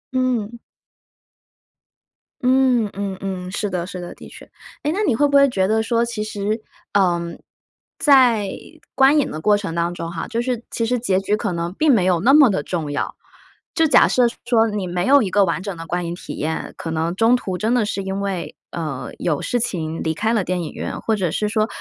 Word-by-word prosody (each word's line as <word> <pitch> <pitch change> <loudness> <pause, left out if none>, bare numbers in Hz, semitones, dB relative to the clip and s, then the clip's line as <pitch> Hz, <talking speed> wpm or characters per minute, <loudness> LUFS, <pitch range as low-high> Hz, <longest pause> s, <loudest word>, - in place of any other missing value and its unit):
嗯。 240 -3 0 1.8
嗯， 255 -3 +3
嗯 195 -1 -4
嗯， 185 -2 -4
是 205 +1 -2
的， 180 -2 -2
是 185 -3 -7
的， 175 - -7
的 - - -12
确。 - - -13 0.4
诶， 300 - 0
那 385 +6 -1
你 250 - +3
会 290 +4 +3
不 280 0 +4
会 280 - +6
觉 190 -5 +1
得 220 +2 +2
说 230 +1 +1
其 235 -2 -3
实， 215 +1 -3 0.3
呃， 180 -4 +3 0.8
在 245 -9 +5 0.5
观 270 +3 +5
影 290 - +1
的 155 - -5
过 210 +6 +3
程 200 -5 -5
当 170 +1 0
中 165 -1 -5
哈， 170 - -5
就 235 0 -2
是 240 -1 -2
其 230 - -2
实 245 +1 0
结 195 -5 +1
局 205 +2 0
可 205 -4 -2
能 170 +1 -3
并 305 0 +4
没 200 - +3
有 180 -2 +2
那 245 +10 +4
么 285 -5 +7
的 150 -7 -1
重 160 -4 -3
要。 - - -3 0.6
就 325 -2 +4
假 - - +6
设 250 - +3 0.2
说 230 -2 +3
你 210 -3 -3
没 180 +1 -2
有 280 -2 +6
一 195 - -2
个 200 0 +4
完 180 +1 -2
整 200 -2 -4
的 165 0 -8
观 175 0 -2
影 170 - -3
体 - - -8
验， 160 +2 -3
可 165 - -5
能 165 +2 -1
中 225 +4 +4
途 190 -6 -3
真 220 +5 0
的 235 -4 +2
是 200 -1 -3
因 190 +1 -3
为， 185 -6 -3 0.2
呃， 155 -6 -4
有 155 -5 -1
事 245 - -1
情 165 -7 -3
离 160 - 0
开 220 +7 0
了 215 -4 +1
电 180 0 -2
影 160 - -6
院， - - -5
或 220 - +1
者 185 -6 -1
是 210 +4 -1
说 215 0 +1
205 Hz, 235 characters per minute, -21 LUFS, 175-235 Hz, 1.8 s, 么